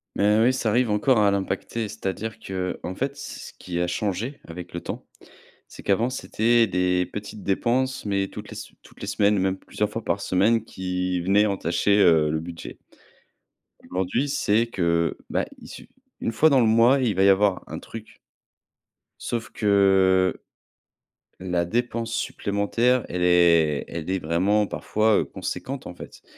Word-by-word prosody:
Mais 105 +2 +3
oui, 120 +3 +4
ça 120 -3 -1
arrive 120 +2 +2
encore 110 +4 +3
à 105 -1 +4
l'impacter, 100 +3 -2
c'est-à-dire 110 +1 -5
qu'en 95 -2 -4
fait, 135 +5 -3
c 140 0 -8
ce - - -10
qui 85 -1 -4
a 90 - +1
changé 105 +9 -3
avec 90 +1 -9
le 85 - -4
temps, - - -7 0.6
c'est - - -13
qu'avant, 110 +5 +1
c'étaient 120 -2 +2
des 90 -1 +1
petites 105 -1 -7
dépenses, 130 +7 0
mais 100 -1 0
toutes - - -9
les - - -9
sem - - -9
toutes - - -18
les - - -5
semaines, 105 0 +2
même 95 0 0
plusieurs - - -3
fois - - -5
par - - -1
semaine 105 +5 +2
qui 90 -2 -3
venaient 100 +4 +3
entacher, 100 +1 +1
heu, 80 -5 +5
le 80 - -1
budget 85 +1 -8 1.1
aujourd'hui, 95 +9 -1
c'est 115 -5 +1
que, 85 -6 0
bah, - - 0
il - - -13
su - - -11 0.3
une 115 - -2
fois 150 +8 +4
dans 140 -3 +4
le 120 - +4
mois, 115 +5 +5
il 120 -5 +1
va 95 - +2
y 100 - +6
avoir 100 -1 +3
un - - -6
truc 110 -1 -10 1.0
sauf 115 -1 -4
que, 95 -3 +3 1.0
la 90 -2 -1
dépense 115 +3 -2
supplémentaire, 115 +3 0
elle 90 - -3
est 85 -4 +4
elle 85 0 -6
est 95 - +1
vraiment 95 +6 +1
parfois, 110 +1 +1
heu, - - +1
conséquente 130 +8 -6
en 90 - -7
fait. - - -12
100 Hz, 170 wpm, -24 LUFS, 90-115 Hz, 1.1 s, y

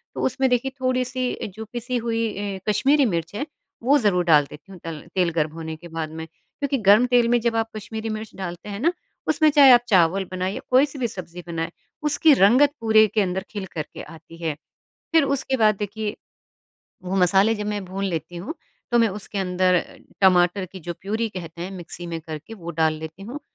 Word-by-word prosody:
तो - - -3
उसमें 260 0 +1
देखिए 250 +2 +1
थोड़ी-सी 255 0 0 0.2
जो 220 +1 -7
पिसी 245 +1 -2
हुई 230 -1 -1 0.3
अ, - - -11
कश्मीरी 275 +7 +3
मिर्च 170 -6 -2
है, 285 - -2 0.4
वो 280 +4 +5
ज़रूर 195 -7 +2
डाल 150 -4 +5
देती 150 +6 -13
हूँ 185 - -11
तल 165 -2 -6
तेल 180 -2 +3
गर्म 155 -1 +1
होने 160 -1 -6
के 170 +2 -12
बाद 160 -1 -4
में, 160 0 -6
क्योंकि 275 - -4
गर्म 215 +5 +7
तेल 240 -1 +5
में 240 0 +4
जब 235 0 0
आप 225 0 0
कश्मीरी 220 +1 -5
मिर्च 215 0 -5
डालते 180 +1 -6
हैं 200 0 -5
ना, 325 +8 +3 0.4
उसमें 310 0 +4
चाहे 280 -3 +8
आप 240 -1 +8
चावल 190 -1 +3
बनाइए, 185 +2 -2
कोई 260 +3 +6
सी 280 -1 -10
भी 240 - +1
सब्ज़ी 180 -4 -8
बनाए, 165 -1 -3 0.3
उसकी 300 +1 +4
रंगत 260 +6 +5
पूरे 220 -1 +5
के 210 +1 +1
अंदर 190 -1 -1
खिल 205 -3 -4
करके 155 -2 -6
आती 165 +1 -13
है। 160 -2 -1 0.6
फिर 320 -3 +6
उसके 270 -1 0
बाद 215 -2 +4
देखिए, 210 +1 -3 0.9
वो 185 +1 -3
मसाले 195 +4 +4
जब 210 -1 -4
मैं 205 -1 -2
भून 190 +2 -4
लेती 170 -1 -4
हूँ, 185 - -5 0.4
तो 240 - +4
मैं 230 - +5
उसके 205 +1 -7
अंदर 180 -1 +2 0.4
टमाटर 185 0 +4
की 190 +1 -11
जो 175 0 -5
प्यूरी 220 +4 -1
कहते 170 -4 -8
हैं 185 - -5
मिक्सी 175 -1 -8
में 165 -1 -4
करके 155 +5 -8
वो 170 -5 -7
डाल 160 -1 +3
लेती 160 +5 -8
हूँ, 250 +7 -7
200 Hz, 205 wpm, -23 LUFS, 175-240 Hz, 0.9 s, चाहे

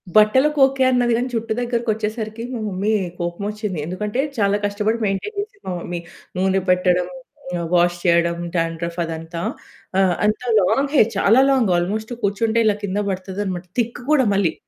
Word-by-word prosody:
బట్టలకు 260 +8 +5
ఓకె, 265 0 0
అన్నది 245 -1 +2
గానీ 245 +2 -1
జూట్టు 225 -1 -1
దగ్గరికొచ్చేసరికి 220 -2 -2
మా 240 - -3
మమ్మీ 195 +2 -2 0.3
కోపమోచ్చింది. 200 +3 -3
ఎందుకంటే 210 +7 -3 0.2
చాలా 200 -2 +2
కష్టపడి 210 +2 0
మెయింటైన్ 200 - -2
చేసింది 405 0 -6
మా - - -2
మమ్మీ. 175 0 -5 0.4
నూనె 190 +1 +2
పెట్టడం, 180 -1 +3 0.7
వాష్ 175 0 +3
చేయడం, 170 -1 +3 0.2
డాండ్రఫ్ 165 0 -2
అదంతా. 165 +1 -5 0.6
ఆహ్, 185 -2 +3
అంత 215 0 +1 0.2
లాంగ్ 275 +9 +1
హెయిర్, 230 -5 +5
చాలా 225 +6 +5
లాంగ్ 255 -8 +3
ఆల్మోస్ట్ 215 +6 -2
కూర్చుంటే 220 +3 +1
ఇలా 210 -1 +3
కింద 200 0 -2
పడుతుందన్నమాట. 190 -1 -4
థిక్ 235 +1 -2
కూడా 280 -4 +4
మళ్ళీ. 195 -5 +2
205 Hz, 145 wpm, -21 LUFS, 180-230 Hz, 0.7 s, బట్టలకు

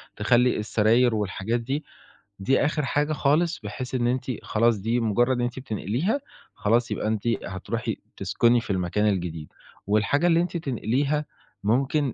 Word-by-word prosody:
تخلّي 125 +4 +3
السراير 110 +3 +3
والحاجات 105 +2 -1
دي، 135 +6 -3 0.6
دي 130 +9 +2
آخِر 150 -1 0
حاجة 145 +3 0
خالص 155 +4 +1
بحيث 125 +5 -5
إن 120 -1 +1
أنتِ 125 +1 -1 0.2
خلاص 115 0 +2
دي 115 +5 0
مُجرّد 120 +3 +2
إن - - -1
أنتِ 120 +1 -2
بتنقليها، 130 - -1 0.4
خلاص 115 +3 +1
يبقى - - -2
أنتِ 110 +1 -1 0.2
هتروحي 95 -1 -4 0.2
تسكُني 115 +5 +2
في 115 - -12
المكان 95 +2 0
الجديد. 85 -6 -2 0.4
والحاجة 110 +11 +2
اللي 170 -1 +4
أنتِ 175 0 -2
تنقليها 140 +1 -1 0.4
ممكن 135 +4 +1
120 Hz, 150 wpm, -25 LUFS, 105-140 Hz, 0.6 s, اللي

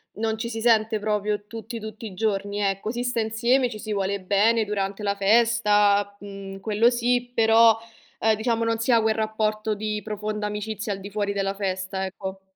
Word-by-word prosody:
non 220 +1 -1
ci 230 +1 -4
si 225 -1 -4
sente 220 -1 +3
proprio 210 0 -1
tutti, 225 +1 -7
tutti 220 +1 -8
i 200 - -7
giorni, 205 0 -1
ecco, 195 +2 -1
si 240 0 -3
sta 245 -2 0
insieme, 240 +4 +2
ci 215 -2 -8
si 215 0 -4
vuole 200 0 -1
bene 210 +4 +2
durante 200 0 -3
la 200 0 0
festa, 205 -1 +3
mhmm, 195 -1 -8
quello 220 +3 +3
sì, 245 0 0
però, 225 0 +5 0.4
ehm, 220 0 +3
diciamo, 230 +1 0
non 230 0 +1
si 230 +3 +1
ha 230 -2 +5
quel 220 0 +1
rapporto 215 0 -1
di 210 0 -3
profonda 210 0 -3
amicizia 210 0 -4
al 195 - -7
di 200 +1 -8
fuori 205 0 -1
della 195 0 -1
festa, 190 -1 -3
ecco. 190 0 -7
215 Hz, 190 wpm, -24 LUFS, 200-225 Hz, 0.4 s, però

